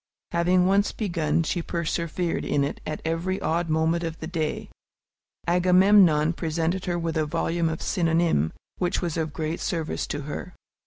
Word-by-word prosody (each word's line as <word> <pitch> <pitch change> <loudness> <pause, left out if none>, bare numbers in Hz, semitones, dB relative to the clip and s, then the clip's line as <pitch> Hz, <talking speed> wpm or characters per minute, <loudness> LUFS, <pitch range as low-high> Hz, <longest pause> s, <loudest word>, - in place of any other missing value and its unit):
Having 180 +1 +3
once 200 +2 +3
begun, 170 -6 0
she 175 +2 -1
persevered 170 +1 -2
in 145 -1 +1
it 140 - -3
at 155 - -4
every 170 +4 -1
odd 165 +1 -1
moment 160 +2 +1
of 165 -1 -4
the - - -5
day. 160 -2 -3 0.8
Agamemnon 180 -2 +5
presented 165 +2 -1
her 175 -1 -1
with 165 -1 -2
a 155 -1 +1
volume 165 +2 0
of 160 - -4
"Synonymes," 165 - +1 0.3
which 180 0 0
was 170 -4 -2
of 160 -2 -2
great 160 +1 -3
service 165 -3 -2
to 145 - -3
her. 150 +5 -6
165 Hz, 160 wpm, -25 LUFS, 160-175 Hz, 0.8 s, Agamemnon